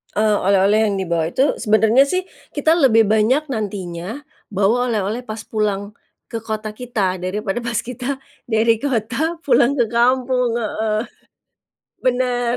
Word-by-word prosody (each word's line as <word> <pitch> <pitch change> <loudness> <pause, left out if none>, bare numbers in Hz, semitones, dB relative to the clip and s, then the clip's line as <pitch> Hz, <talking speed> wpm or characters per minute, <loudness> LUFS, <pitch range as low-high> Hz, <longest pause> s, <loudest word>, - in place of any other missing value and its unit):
Eee, 215 0 +3
oleh-oleh 200 +3 +3
yang 200 - -1
dibawa 170 -4 -1
itu 265 - +1
sebenarnya 220 +3 +4
sih 370 +5 0 0.3
kita 305 +2 +2
lebih 225 -6 +5
banyak 220 +8 +2
nantinya 200 +1 -5 0.2
bawa 215 +5 +1
oleh-oleh 215 0 -1
pas 220 0 -6
pulang 205 -2 -2 0.4
ke 230 - -3
kota 215 -1 -4
kita 210 -5 -2
daripada 195 +4 -2
pas 235 0 -4
kita 250 +3 -4 0.3
dari 225 -1 +2
kota 270 +5 -1
pulang 280 -1 +3
ke 250 - +3
kampung, 250 0 +2
heeh. 215 -1 -1 1.1
Benar. 245 -1 +1
225 Hz, 135 wpm, -20 LUFS, 210-250 Hz, 1.1 s, lebih